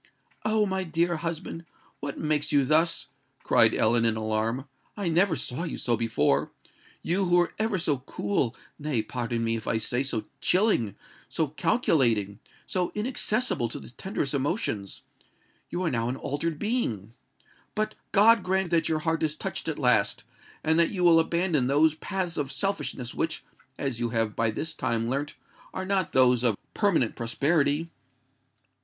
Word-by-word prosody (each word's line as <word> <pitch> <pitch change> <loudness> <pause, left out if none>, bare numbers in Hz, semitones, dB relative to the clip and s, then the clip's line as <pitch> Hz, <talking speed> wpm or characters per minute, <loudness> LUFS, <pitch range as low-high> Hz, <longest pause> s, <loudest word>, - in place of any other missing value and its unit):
"Oh! 215 0 +2
my 190 -1 -1
dear 170 0 0
husband, 165 0 -5 0.4
what 140 -1 -5
makes 150 -1 0
you 140 -2 +4
thus?" 160 +4 +2 0.4
cried - - +5
Ellen, 115 +1 +3
in 115 -1 +4
alarm: 110 +4 -1 0.3
"I 200 -4 -1
never 170 +1 +3
saw 125 +2 -2
you 165 - -4
so 120 - +1
before. 115 -12 +1 0.5
You 190 +3 +1
who 175 -1 +3
were 175 -1 +2
ever 215 -2 +1
so 150 -6 +1
cool—nay, 125 +2 -2
pardon 120 0 -3
me, 115 0 +1
if 110 -1 -6
I 115 - +1
say 120 +3 -1
so 115 -6 -2 0.2
chilling,—so 160 - 0
calculating—so 145 - 0
inaccessible 215 - 0
to - - -5
the - - -12
tenderest 150 - -3
emotions,—you 140 - -5
are 170 - 0
now 115 -1 0
an 125 - -2
altered 145 +4 -3
being! 125 - -2 0.6
But 215 0 -1 0.2
God 225 +2 +6
grant 190 -1 0
that 165 -2 +2
your 155 -1 0
heart 160 0 +1
is 155 -1 0
touched - - -4
at 160 - -2
last, 125 -7 +2 0.4
and 160 +1 +3
that 170 - +4
you 185 -3 -2
will 170 -2 +7
abandon 165 -5 +1
those 150 +3 +4
paths 175 +2 -3
of 140 -2 -2
selfishness 135 - -2
which, 160 -1 -2 0.3
as 135 -4 -2
you 120 -1 0
have 115 -2 0
by 115 0 +1
this 155 +9 -3
time 115 -6 -1
learnt, 140 +4 -2 0.4
are 190 - -3
not 190 -3 0
those 125 -2 +4
of 115 -5 +2 0.2
permanent 175 - +2
prosperity! 145 +6 0
150 Hz, 155 wpm, -27 LUFS, 120-175 Hz, 0.6 s, will